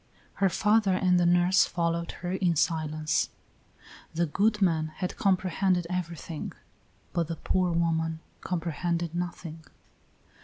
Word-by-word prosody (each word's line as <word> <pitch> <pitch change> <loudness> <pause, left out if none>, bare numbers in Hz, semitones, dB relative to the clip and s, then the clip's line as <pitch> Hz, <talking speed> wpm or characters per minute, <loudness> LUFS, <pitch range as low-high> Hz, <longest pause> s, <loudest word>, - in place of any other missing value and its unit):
Her 195 - +5
father 210 +1 +3
and 180 -1 +3
the 175 - +3
nurse 175 +2 +5
followed 170 -1 -1
her 175 - -1
in 185 -3 +1
silence. 155 -1 0 0.9
The 170 +1 +2
good 210 +7 +1
man 165 -5 +2
had 180 -2 -3
comprehended 185 -1 +1
everything, 170 -3 -4 0.6
but 170 -2 0
the 165 - -3
poor 180 +2 0
woman 165 -1 0 0.2
comprehended 170 -1 -2
nothing. 170 -2 -5
175 Hz, 120 wpm, -28 LUFS, 165-185 Hz, 0.9 s, Her